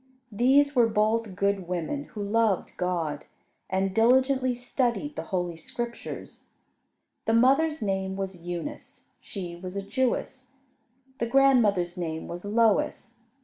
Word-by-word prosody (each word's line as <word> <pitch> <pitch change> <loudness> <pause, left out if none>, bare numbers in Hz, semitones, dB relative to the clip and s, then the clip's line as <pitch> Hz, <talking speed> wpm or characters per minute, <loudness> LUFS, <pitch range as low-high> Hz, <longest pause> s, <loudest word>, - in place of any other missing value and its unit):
These 275 +6 +4
were 240 -2 +5
both 215 -1 +1
good 200 -2 0
women, 180 - -3
who 210 -6 -6
loved 210 -2 +1
God, 165 -5 -2 0.4
and 190 0 0
diligently 255 +3 +3
studied 250 +3 -1
the - - -5
Holy 175 -3 -2
Scriptures. 235 +8 -7 0.8
The 225 - +2
mother's 275 +4 +3
name 190 -1 -1
was 190 -2 -5
Eunice. 175 - -7
She 180 -4 -7
was 180 +2 -8
a 200 - -3
Jewess. 260 +2 -2 0.7
The 235 - 0
grandmother's 225 -10 +3
name 160 -2 -4
was 175 +1 -6
Lois. 220 +2 +1
210 Hz, 125 wpm, -27 LUFS, 185-250 Hz, 0.8 s, were